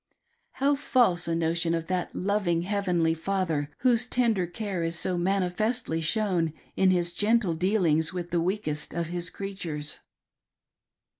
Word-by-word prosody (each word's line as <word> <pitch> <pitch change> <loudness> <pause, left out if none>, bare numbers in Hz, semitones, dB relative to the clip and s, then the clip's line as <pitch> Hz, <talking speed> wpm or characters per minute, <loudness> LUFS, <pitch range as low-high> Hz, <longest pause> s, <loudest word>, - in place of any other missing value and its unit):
How 280 +2 +2
false 240 - +2
a 165 - 0
notion 165 0 +1
of 165 -1 -3
that 185 0 -2
loving 185 -4 0
heavenly 180 -4 +1
Father 165 -4 -1
whose 245 -1 +3
tender 225 -8 +1
care 195 0 -4
is 165 0 0
so 180 +1 0
manifestly 190 +1 0
shown 175 -3 +1 0.2
in 190 - +4
his 175 -1 +1
geritle 210 -5 +2
dealings 165 -4 +2
with 175 -1 -5
the 170 -1 +1
weakest 170 -6 -2
of 170 -1 -2
His 175 -1 -2
creatures 175 -7 -4
180 Hz, 140 wpm, -27 LUFS, 165-200 Hz, 0.2 s, in